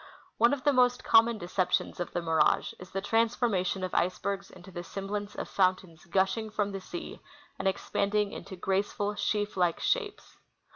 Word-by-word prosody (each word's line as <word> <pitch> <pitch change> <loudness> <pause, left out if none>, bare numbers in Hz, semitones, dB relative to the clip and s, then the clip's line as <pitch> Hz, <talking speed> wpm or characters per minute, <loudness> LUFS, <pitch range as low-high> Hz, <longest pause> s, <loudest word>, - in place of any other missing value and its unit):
One 235 +1 +6
of 285 -2 -2
the 290 -1 +4
most 250 -1 +3
common 230 0 +5
deceptions 180 -1 -1
of 175 - -3
the 175 - -2
mirage 160 -1 +2
is 180 - -10
the 195 - -3
transformation 225 -4 +1
of 185 - -3
icebergs 195 +2 -1
into 185 +1 -13
the 175 -1 -6
semblance 200 +2 -5
of - - -4
fountains 185 -3 0
gush 190 +4 +1
ing 220 -1 -4
from 205 -1 -1
the 195 -1 -5
sea 340 - -7 0.4
and - - 0
expanding 200 +2 0
into 200 -1 -8
graceful, 200 +2 -1
sheaf 210 0 -1
like 175 -3 +1
shapes. 450 -5 -2
200 Hz, 175 wpm, -29 LUFS, 185-220 Hz, 0.4 s, One